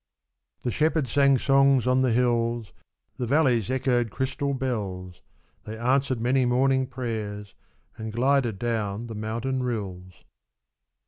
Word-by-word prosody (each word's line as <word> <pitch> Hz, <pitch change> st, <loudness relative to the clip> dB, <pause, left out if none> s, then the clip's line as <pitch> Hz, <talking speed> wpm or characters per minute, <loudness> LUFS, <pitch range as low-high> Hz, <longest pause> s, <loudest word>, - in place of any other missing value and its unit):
The 120 Hz, -, -1 dB
shepherd 155 Hz, -1 st, +1 dB
sang 140 Hz, +2 st, +4 dB
songs 135 Hz, -1 st, +3 dB
on 130 Hz, +1 st, +3 dB
the 130 Hz, -2 st, +2 dB
hills. 115 Hz, -3 st, 0 dB, 0.4 s
The 125 Hz, -, -3 dB
valleys 125 Hz, -, +2 dB
echoed 125 Hz, -3 st, +1 dB
crystal 140 Hz, +3 st, -2 dB
bells, 100 Hz, -9 st, -4 dB, 0.4 s
They 110 Hz, +1 st, -7 dB
answered 130 Hz, +1 st, +1 dB
many 130 Hz, +3 st, +2 dB
morning 130 Hz, +2 st, +2 dB
prayers 110 Hz, -5 st, -5 dB, 0.4 s
And 110 Hz, 0 st, -5 dB
glided 125 Hz, -2 st, +1 dB
down 110 Hz, -1 st, -2 dB
the 115 Hz, -, -7 dB
mountain 115 Hz, +5 st, -3 dB
rills. 95 Hz, -7 st, -5 dB
120 Hz, 125 wpm, -26 LUFS, 110-130 Hz, 0.4 s, sang